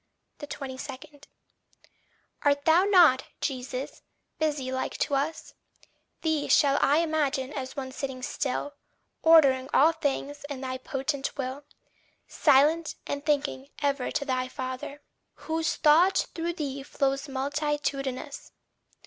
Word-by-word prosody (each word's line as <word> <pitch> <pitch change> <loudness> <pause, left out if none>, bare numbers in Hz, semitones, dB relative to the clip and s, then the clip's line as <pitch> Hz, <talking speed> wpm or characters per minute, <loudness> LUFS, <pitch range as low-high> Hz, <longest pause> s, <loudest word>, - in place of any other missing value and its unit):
22. 275 -3 -6 1.5
Art 285 0 +2
thou 330 +3 +5
not, 345 -10 +6
Jesus, 260 -1 -4 0.4
busy 295 -4 -1
like 260 0 -3
to 290 - -1
us? 285 +4 -2 0.7
Thee 315 -3 0
shall 280 -1 +4
I 300 +4 +4
image 310 -3 0
as 265 0 -5
one 260 -1 -4
sitting 260 -1 -5
still, 285 +2 -2 0.5
Ordering 275 -5 +5
all 310 +4 +6
things 290 -2 -3
in 275 -2 -5
thy 260 -1 -4
potent 275 +2 -3
will, 270 +1 -4 0.6
Silent, 300 +3 +3
and 285 0 -4
thinking 285 -2 -1 0.2
ever 280 -2 0
to 280 - -2
thy 255 -2 -1
father, 260 +2 -6 0.3
Whose 320 0 -2
thought 330 +5 +4
through 340 +1 -2
thee 280 -4 -4
flows 275 +1 -1
multitudinous? 280 0 -3
280 Hz, 115 wpm, -27 LUFS, 265-305 Hz, 1.5 s, not